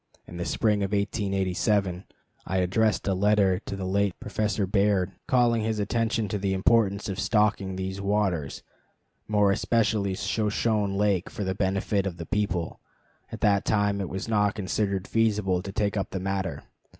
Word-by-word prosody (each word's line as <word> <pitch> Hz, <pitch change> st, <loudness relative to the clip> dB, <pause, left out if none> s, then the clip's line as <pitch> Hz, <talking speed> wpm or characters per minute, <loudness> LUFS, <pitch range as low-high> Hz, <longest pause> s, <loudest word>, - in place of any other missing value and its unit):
In 85 Hz, -, -10 dB
the 85 Hz, -, -3 dB
spring 105 Hz, -2 st, +1 dB
of 100 Hz, +1 st, -2 dB
1887 100 Hz, -2 st, 0 dB, 0.4 s
I 95 Hz, -, -1 dB
addressed 100 Hz, +4 st, +1 dB
a 95 Hz, -, +2 dB
letter 100 Hz, -1 st, +3 dB
to 100 Hz, -, -6 dB
the 95 Hz, -1 st, -4 dB
late 100 Hz, 0 st, 0 dB
Professor 105 Hz, -1 st, -1 dB
Baird, 100 Hz, -1 st, +1 dB, 0.2 s
calling 120 Hz, -3 st, +3 dB
his 110 Hz, 0 st, -1 dB
attention 115 Hz, +1 st, 0 dB
to 105 Hz, -, -2 dB
the 95 Hz, 0 st, 0 dB
importance 100 Hz, 0 st, +2 dB
of 95 Hz, -1 st, -4 dB
stocking 100 Hz, -2 st, +1 dB
these 95 Hz, +1 st, -4 dB
waters, 100 Hz, -7 st, -1 dB, 0.6 s
more 105 Hz, -2 st, +3 dB
especially 110 Hz, -2 st, +1 dB
Shoshone 105 Hz, -1 st, 0 dB
Lake, 100 Hz, -3 st, +1 dB
for 105 Hz, -, -5 dB
the 95 Hz, -1 st, -1 dB
benefit 100 Hz, +1 st, 0 dB
of 90 Hz, -3 st, -5 dB
the 85 Hz, -, -6 dB
people. 90 Hz, -4 st, -2 dB, 0.5 s
At -, -, -7 dB
that 100 Hz, -1 st, +3 dB
time 105 Hz, -1 st, +1 dB
it 95 Hz, -, -4 dB
was 95 Hz, +4 st, -5 dB
not 105 Hz, -2 st, +2 dB
considered 100 Hz, -1 st, -1 dB
feasible 105 Hz, -5 st, +1 dB
to 100 Hz, -, -7 dB
take 105 Hz, 0 st, -1 dB
up 95 Hz, -, -2 dB
the 95 Hz, -, -4 dB
matter. 95 Hz, -2 st, -3 dB
100 Hz, 165 wpm, -26 LUFS, 95-105 Hz, 0.6 s, letter